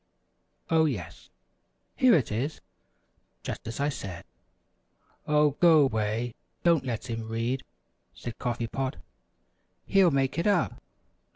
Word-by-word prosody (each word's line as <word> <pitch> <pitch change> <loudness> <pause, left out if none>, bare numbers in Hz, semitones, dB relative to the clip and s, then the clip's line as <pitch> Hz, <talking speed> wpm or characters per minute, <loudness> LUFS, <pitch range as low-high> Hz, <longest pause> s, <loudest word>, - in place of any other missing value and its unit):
Oh, 160 -1 +5
yes, 120 - -4 0.7
here 255 -2 +6
it 135 -10 +1
is, 130 +9 -2 0.8
just - - -5
as 115 - -5
I 145 +1 +1
said!" 100 -10 -6 1.0
"Oh, 150 0 +4
go 160 -4 +7
'way! 110 0 -1 0.3
Don't 170 -5 +4
let 115 -2 -3
him 115 -2 -4
read," 115 +4 -1 0.5
said 120 -2 -7
Coffee 120 -1 -2
Pot; 130 +3 -3 0.9
"he'll 195 -3 +5
make 135 +1 0
it 170 - +1
up." 200 -5 +1
130 Hz, 120 wpm, -28 LUFS, 115-155 Hz, 1.0 s, go